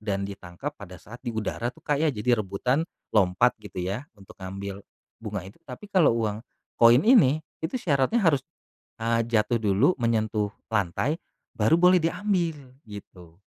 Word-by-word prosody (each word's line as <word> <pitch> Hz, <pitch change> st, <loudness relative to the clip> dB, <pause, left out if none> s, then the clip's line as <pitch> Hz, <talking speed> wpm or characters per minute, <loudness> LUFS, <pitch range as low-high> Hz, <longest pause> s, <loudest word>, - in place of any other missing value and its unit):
dan 100 Hz, -2 st, -2 dB
ditangkap 100 Hz, +7 st, -7 dB
pada 90 Hz, -3 st, -10 dB
saat 120 Hz, +7 st, -13 dB
di 125 Hz, -, -6 dB
udara 110 Hz, +2 st, -2 dB
tuh 125 Hz, -, -11 dB
Kak 145 Hz, -1 st, 0 dB
ya, 160 Hz, -, +3 dB
jadi 120 Hz, -2 st, +1 dB
rebutan 125 Hz, -, -1 dB, 0.3 s
lompat 105 Hz, +4 st, +3 dB
gitu 95 Hz, -3 st, -6 dB
ya 100 Hz, +10 st, -4 dB
untuk 95 Hz, -1 st, -15 dB
ngambil 100 Hz, +1 st, -6 dB, 0.4 s
bunga 105 Hz, -4 st, -5 dB
itu, 100 Hz, +11 st, -13 dB
tapi 210 Hz, -1 st, -10 dB
kalau 170 Hz, -, +4 dB
uang 110 Hz, -2 st, -1 dB, 0.4 s
koin 120 Hz, +3 st, +7 dB
ini 155 Hz, -, +5 dB, 0.2 s
itu 160 Hz, +10 st, -3 dB
syaratnya 155 Hz, -, +1 dB
harus, 150 Hz, -6 st, +3 dB, 0.6 s
eee, 115 Hz, 0 st, +1 dB
jatuh 115 Hz, +1 st, +1 dB
dulu, 105 Hz, -, +3 dB
menyentuh 110 Hz, -3 st, 0 dB, 0.2 s
lantai 105 Hz, -, 0 dB, 0.3 s
baru 110 Hz, +9 st, +3 dB
boleh 180 Hz, +1 st, +5 dB
diambil 175 Hz, -1 st, 0 dB, 0.3 s
gitu. 90 Hz, -4 st, -12 dB
115 Hz, 155 wpm, -26 LUFS, 100-150 Hz, 0.6 s, koin